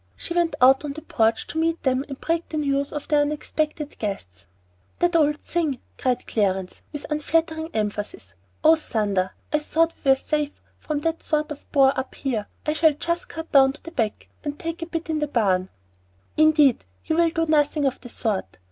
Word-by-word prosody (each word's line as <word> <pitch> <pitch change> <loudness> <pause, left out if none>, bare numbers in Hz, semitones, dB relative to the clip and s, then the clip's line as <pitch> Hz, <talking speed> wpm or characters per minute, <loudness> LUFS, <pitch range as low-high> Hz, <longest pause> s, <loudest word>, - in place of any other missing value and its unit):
She 340 - -4
went 340 -3 +1
out 265 +3 +6
on 290 -2 -4
the 310 +1 -9
porch 225 0 +1
to 320 - -4
meet 330 +1 0
them 260 0 +2
and 275 - -7
break 330 0 -1
the 315 - -3
news 280 -1 0
of 295 - -5
the 300 - +3
unexpected 300 0 -1
guests. 90 - -5 0.5
"That 350 0 +2
old 300 -2 +4
thing!" 315 -6 -1 0.2
cried 255 -2 0
Clarence, 190 -3 -1
with 295 - -6
unflattering 320 +1 0
emphasis. 210 - -3 0.3
"Oh, 320 +1 +7
thunder! 205 -10 0 0.2
I 300 - +4
thought 325 +2 +1
we 275 - +2
were 270 - +8
safe 295 +1 -2 0.2
from 300 -2 -3
that 325 +1 -1
sort 305 -1 -1
of 295 - -9
bore 270 -2 +5
up 260 - -5
here. 230 -7 -2 0.2
I 300 - +1
shall 315 0 +4
just 340 +4 -2
cut 325 0 -7
down 270 -1 +6
to 300 - -15
the 330 - -8
back 225 -10 -2 0.2
and 290 -1 -4
take 330 +2 -5
a 330 - -3
bite 330 -1 -3
in 310 - 0
the 300 - 0
barn." 190 -8 +1 0.7
"Indeed 305 -4 +5 0.2
you 315 - 0
will 335 0 +4
do 330 0 0
nothing 295 -1 +2
of 265 -1 -1
the 245 - -10
sort. 205 - -2
295 Hz, 200 wpm, -24 LUFS, 255-320 Hz, 0.7 s, were